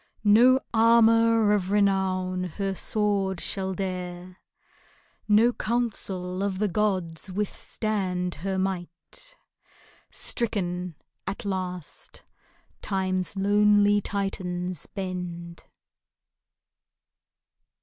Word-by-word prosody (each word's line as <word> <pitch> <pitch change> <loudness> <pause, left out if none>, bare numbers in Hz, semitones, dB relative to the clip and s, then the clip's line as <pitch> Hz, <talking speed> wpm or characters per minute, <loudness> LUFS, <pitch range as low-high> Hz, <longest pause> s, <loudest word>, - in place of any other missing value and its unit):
No 240 +5 +6
armor 230 -1 +5
of 190 -3 0
renown 190 -2 +1
her 195 +3 -3
sword 195 -2 0
shall 190 +1 -1
dare, 180 -1 -5 0.9
No 220 +3 +5
council 195 -6 -2
of 200 -1 -1
the 210 +2 +1
gods 185 -3 -1
withstand 190 -2 -2
her 190 +1 -2
might: 190 - -4 0.7
Stricken 180 -6 -1 0.3
at 195 +2 -4
last 180 -4 -5 0.6
Time's 185 -1 -1
lonely 205 +1 +4
Titans 185 -4 -3
bend. 180 -3 -6
195 Hz, 75 wpm, -26 LUFS, 180-210 Hz, 0.9 s, No